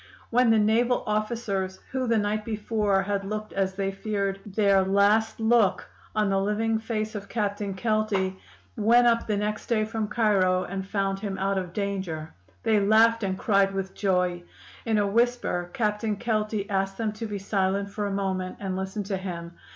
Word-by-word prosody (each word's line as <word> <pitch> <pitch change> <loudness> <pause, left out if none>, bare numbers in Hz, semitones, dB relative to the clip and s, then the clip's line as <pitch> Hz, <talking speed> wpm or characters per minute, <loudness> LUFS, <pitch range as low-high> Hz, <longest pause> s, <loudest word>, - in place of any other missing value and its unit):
"When 245 0 +4
the 225 - +5
naval 230 +4 +2
officers, 210 -3 -2
who 260 -1 -1
the 230 -1 +3
night 210 0 0
before 210 -2 0
had 200 0 -1
looked, 215 +2 -5
as 190 -1 -1
they 195 0 -1
feared, 195 -1 -2
their 200 -1 +3
last 200 +4 +2
look 225 -3 +2 0.3
on 215 -1 +2
the 195 0 +2
living 220 +2 0
face 220 -1 -3
of 200 -2 -7
Captain 205 -3 -2
Kelty, 205 -3 0 0.4
went 235 +3 +4
up 230 -1 +3
the 210 -2 0
next 210 +1 -2
day 215 -2 +1
from 220 -1 -3
Cairo 195 -5 +2
and 190 0 -5
found 195 -1 -1
him 195 -2 -4
out 195 0 0
of 180 -2 -6
danger, 190 -6 -3 0.3
they 220 -2 +3
laughed 220 +3 +4
and 190 -2 -1
cried 195 -2 +2
with 190 0 -3
joy. 180 -3 0 0.5
In 220 -1 +2
a 205 - +3
whisper 225 -5 0
Captain 210 -1 -1
Kelty 215 -2 -1
asked 195 -1 -1
them 225 -2 -1
to 220 +2 -6
be 205 -1 -4
silent 195 0 -1
for 205 0 -2
a - - -3
moment 190 -2 -2
and 190 -2 -3
listen 190 +2 -3
to 195 0 -2
him. 170 -3 -6
205 Hz, 180 wpm, -26 LUFS, 195-220 Hz, 0.5 s, the